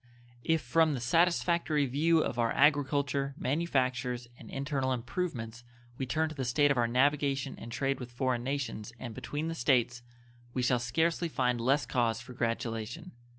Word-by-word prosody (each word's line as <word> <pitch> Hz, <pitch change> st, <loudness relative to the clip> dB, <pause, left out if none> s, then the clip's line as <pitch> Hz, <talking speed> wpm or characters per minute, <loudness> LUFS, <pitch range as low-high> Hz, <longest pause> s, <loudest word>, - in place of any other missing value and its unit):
If 160 Hz, -1 st, +2 dB
from 160 Hz, -3 st, +3 dB
the -, -, -3 dB
satisfactory 170 Hz, +2 st, +2 dB
view 155 Hz, +5 st, +3 dB
of 120 Hz, -, -3 dB
our 115 Hz, -1 st, +2 dB
agriculture, 140 Hz, -1 st, +2 dB
manufactures, 130 Hz, -5 st, -1 dB
and 115 Hz, -, -13 dB
internal 135 Hz, -1 st, -1 dB
improvements 120 Hz, -3 st, -4 dB, 0.4 s
we 130 Hz, -, -2 dB
turn 160 Hz, +5 st, +1 dB
to -, -, -7 dB
the 135 Hz, -3 st, -3 dB
state 140 Hz, +4 st, +3 dB
of 140 Hz, -, +1 dB
our 120 Hz, -, +3 dB
navigation 135 Hz, +2 st, +1 dB
and 115 Hz, -, -8 dB
trade 135 Hz, +3 st, -1 dB
with 125 Hz, -1 st, -7 dB
foreign 125 Hz, -1 st, -1 dB
nations 125 Hz, -5 st, -3 dB
and 120 Hz, -2 st, -6 dB
between 150 Hz, +7 st, -4 dB
the 165 Hz, -, -2 dB
States, 125 Hz, -4 st, +1 dB, 0.5 s
we 125 Hz, -, 0 dB
shall 125 Hz, 0 st, +3 dB
scarcely 165 Hz, +8 st, 0 dB
find 125 Hz, -5 st, 0 dB
less 135 Hz, +4 st, +2 dB
cause 115 Hz, -3 st, 0 dB
for 120 Hz, +2 st, -10 dB
gratulation. 115 Hz, +7 st, -3 dB
130 Hz, 165 wpm, -31 LUFS, 120-150 Hz, 0.5 s, from